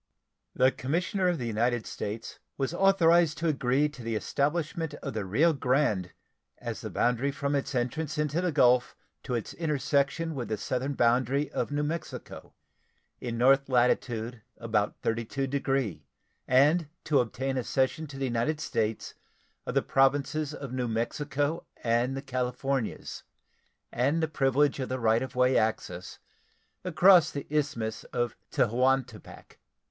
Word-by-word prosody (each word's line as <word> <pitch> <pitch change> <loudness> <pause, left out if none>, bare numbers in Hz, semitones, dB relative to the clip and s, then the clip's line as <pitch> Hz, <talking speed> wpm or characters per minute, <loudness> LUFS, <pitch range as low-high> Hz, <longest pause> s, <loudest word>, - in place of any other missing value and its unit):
The 130 +1 +4
commissioner 180 +9 -1
of 175 -1 +1
the 125 - -4
United 115 +1 0
States 110 +2 -6 0.2
was 135 +3 -1
authorized 175 -4 +4
to 165 - -1
agree 140 -1 +2
to 145 -4 -12
the 115 -1 -3
establishment 150 - -1
of - - -6
the 110 -3 -3
Rio 150 - +3
Grande 125 - +1 0.5
as - - -6
the - - -5
boundary 125 +3 +1
from 140 +1 -2
its 140 0 -1
entrance 145 +5 -2
into 150 +2 0
the 180 -1 0
Gulf 125 -4 +3 0.3
to 125 - -3
its 115 - -4
intersection 150 0 0
with 125 -5 -4
the 110 - -2
southern 130 +6 -2
boundary 130 +4 +2
of - - -2
New 145 +1 -1
Mexico, 155 +1 -6 0.6
in 120 -2 -4
north 135 +3 +4
latitude 120 -2 +1 0.2
about 110 -3 0
32 115 +4 -1
degree, 135 - -1 0.4
and 145 +5 +4
to 150 -3 +3
obtain 130 +3 -1
a 130 - -1
cession 135 +6 0
to 135 -1 -9
the 135 - -1
United 125 +5 0
States 110 -6 -2 0.5
of - - -3
the - - +3
Provinces 140 +2 +2
of 140 -4 -7
New 125 -1 -1
Mexico 145 +7 -1 0.2
and 120 +3 +1
the 135 - -5
Californias 130 -1 -3 0.7
and 140 +7 +1
the - - +2
privilege 140 -1 +2
of 130 - -3
the 130 0 -2
right 115 -1 +3
of 130 -1 -5
way 125 +1 +3 1.3
across 180 -1 +6
the 140 - -5
Isthmus 140 -8 -1
of 120 -1 -2
Tehuantepec. 125 0 -1
135 Hz, 145 wpm, -28 LUFS, 120-150 Hz, 1.3 s, across